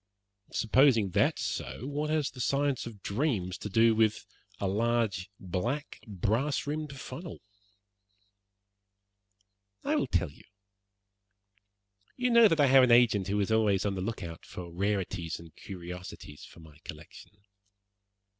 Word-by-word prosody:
"Supposing 115 -4 +3
that - - +2
is - - -2
so, 125 - -4
what 145 +2 -2
has 155 -2 0
the 125 - -8
science 140 0 0
of 105 -5 -11
dreams 100 - -1
to 105 - -5
do 115 +3 +4
with 110 -1 +1 0.3
a 100 - -1
large, 105 -2 0
black, 115 - -3
brass 110 - 0
rimmed 150 -2 -4
funnel?" 160 +8 -8 2.4
"I - - +1
will - - +1
tell - - 0
you. - - -19 1.7
You 250 -1 +1
know 235 -1 +8
that 165 -5 +1
I 145 - +6
have 135 0 +7
an 125 - +4
agent 110 -5 +5
who 100 +1 0
is 100 - -1
always 105 -3 +2
on 100 - 0
the 95 - -4
look 110 +2 -4
out 85 -1 -8
for 85 -2 -9
rarities 95 -3 -2
and 85 -1 -14
curiosities 90 -5 -9
for - - -15
my 75 -1 -16
collection. 80 +6 -11
110 Hz, 145 wpm, -30 LUFS, 95-135 Hz, 2.4 s, know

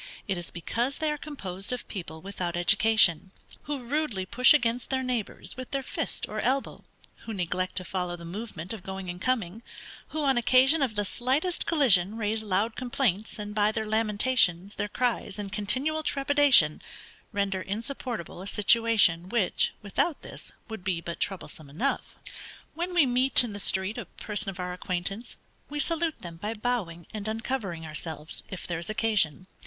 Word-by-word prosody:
It 195 - +1
is 175 -1 -5
because 235 +10 -2
they 310 -1 0
are 300 - -2
composed 195 -11 -5
of 250 - -4
people 165 -5 -6
without 180 -2 -4
education, 200 -1 +4 0.4
who 285 -3 -3
rudely 240 -7 -1
push 250 +6 +5
against 245 -5 +2
their 260 -1 0
neighbors, 245 -5 -3
with 255 -1 -7
their 275 -1 -1
fist - - -2
or 215 - -4
elbow, 265 +4 -1 0.4
who 225 - -3
neglect 185 0 -2
to 185 - 0
follow 180 -1 -3
the 170 -1 -10
movement 190 -1 -6
of 220 - -7
going 190 -1 -5
and 180 +1 -10
coming; 225 -5 -1 0.5
who, 310 -1 -3
on 270 -3 +3
occasion 260 +6 +5
of 250 -6 0
the 205 0 0
slightest 270 - 0
collision, 220 - +4
raise 220 0 0
loud 210 +2 0
complaints, 235 -5 -1
and, 210 -1 -6
by 210 0 +3
their 220 0 -2
lamentations, 210 -3 +2
their 205 - -2
cries, 225 -2 -1
and 205 -1 -6
continual 260 +10 0
trepidation, 280 - +4 0.5
render 200 -3 -1
insupportable 225 -2 -4
a 195 - -7
situation 210 -5 +3
which, 220 -4 +2
without 275 - 0
this, - - -7 0.2
would 220 -5 -7
be 180 -3 0
but 170 0 -6
troublesome 160 -6 -4
enough. 235 - -1 0.6
When 350 +2 -3
we 335 -5 +6
meet, 255 +1 +5
in 230 -4 -5
the 205 - -5
street, 190 +1 +3
a - - -5
person 205 -2 -2
of 190 -1 -8
our 180 0 -3
acquaintance, 185 +5 -4 0.3
we 295 0 -4
salute 325 +1 0
them 170 -2 -7
by 210 +6 -4
bowing 210 -8 -2
and 215 -1 -4
uncovering 220 -7 -3
ourselves, 155 0 -6
if 185 - -6
there 175 -2 -3
is 170 - -2
occasion. 215 -8 +1
215 Hz, 170 wpm, -28 LUFS, 185-255 Hz, 0.6 s, we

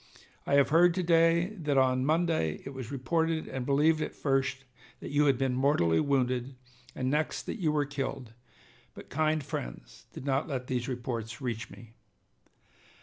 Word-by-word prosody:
I 140 - +3
have 140 -1 +4
heard 170 +2 +5
to 185 - 0
day 165 +1 +4
that 150 -5 -1
on 130 0 +3
Monday 155 - +1
it 135 - -6
was 130 -2 -7
reported 160 +5 -1
and 130 -1 -5
believed 155 +3 +3
at - - -4
first 135 -1 0 0.4
that - - -7
you 145 +1 +3
had 135 -3 +3
been 135 -1 0
mortally 125 - +2
wounded, 130 -2 0 0.4
and 130 0 -1
next 155 +1 -1
that 225 - -6
you 155 -3 +2
were 150 -1 +1
killed, 135 -4 -5 0.6
but - - -11
kind 155 +1 +1
friends - - -7
did - - -9
not 135 +1 0
let 130 -4 -3
those 125 -1 -2
reports 120 -3 -4
reach 115 -4 -4
me. 115 -1 -14
135 Hz, 170 wpm, -29 LUFS, 125-155 Hz, 0.6 s, heard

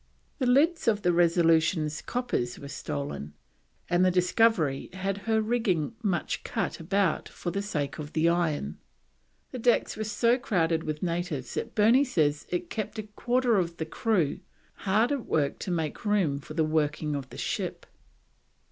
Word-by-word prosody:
The 255 - +1
lids 300 +5 +3
of 210 -3 +2
the 175 -1 +3
Resolution's 165 -2 +3
coppers 180 - -2
were 140 - -9
stolen, 75 - -5 0.5
and 175 +1 +3
the 185 - +5
discovery 180 -5 +2
had 195 +1 -2
her 220 0 +4
rigging 215 -7 0
much 190 -7 -1
cut - - -2
about 190 +1 0
for 175 - -5
the 200 +3 -2
sake 150 -10 -3
of 150 0 -7
the 160 +1 +2
iron. 160 - 0 0.7
The 255 - -5
decks 240 +1 +2
were 215 - -3
so 230 +4 +2
crowded 165 -9 0
with 155 -1 -3
the - - 0
natives 170 -6 -3
that - - -4
Burney 230 +6 +5
says 155 - 0
it 350 -1 -3
kept 220 0 -4
a 215 - -3
quarter 240 +2 +1
of 170 -2 -1
the 160 - -3
crew 175 -2 0 0.3
hard 215 +6 +1
at 280 -4 -2
work 145 -3 0
to - - -5
make 160 -4 -2
room 195 -10 +1
for 155 +2 -10
the 160 - +2
working 155 -1 0
of 135 -2 -5
the - - -10
ship. - - -3
175 Hz, 170 wpm, -28 LUFS, 155-220 Hz, 0.7 s, the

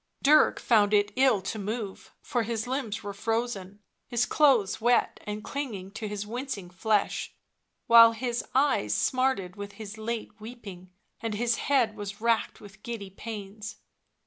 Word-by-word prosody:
Dirk 300 +2 +5
found 210 -3 +4
it 205 0 +2
ill 255 -7 +3
to 215 +3 -4
move, 210 0 -5
for 245 - 0
his 225 -1 -2
limbs 250 -6 -3
were 200 0 -5
frozen, 205 -2 -2 0.3
his 240 0 +1
clothes 235 -8 +3
wet 240 +1 +2
and 210 0 -4
clinging 220 -10 -5
to 220 +1 -5
his 205 0 -4
wincing 225 -5 -5
flesh, 205 +3 0 0.5
while 230 0 +8
his 240 +1 -2
eyes 265 - +2
smarted 255 -8 0
with 200 0 -7
his 215 -1 -9
late 230 +1 -4
weeping, 210 -6 -10 0.3
and 225 -2 -3
his 230 +1 +1
head 250 -6 +2
was 200 -1 -6
racked 230 0 0
with 200 -1 -14
giddy 215 -5 -6
pains. 210 +1 -7
220 Hz, 150 wpm, -28 LUFS, 200-240 Hz, 0.5 s, while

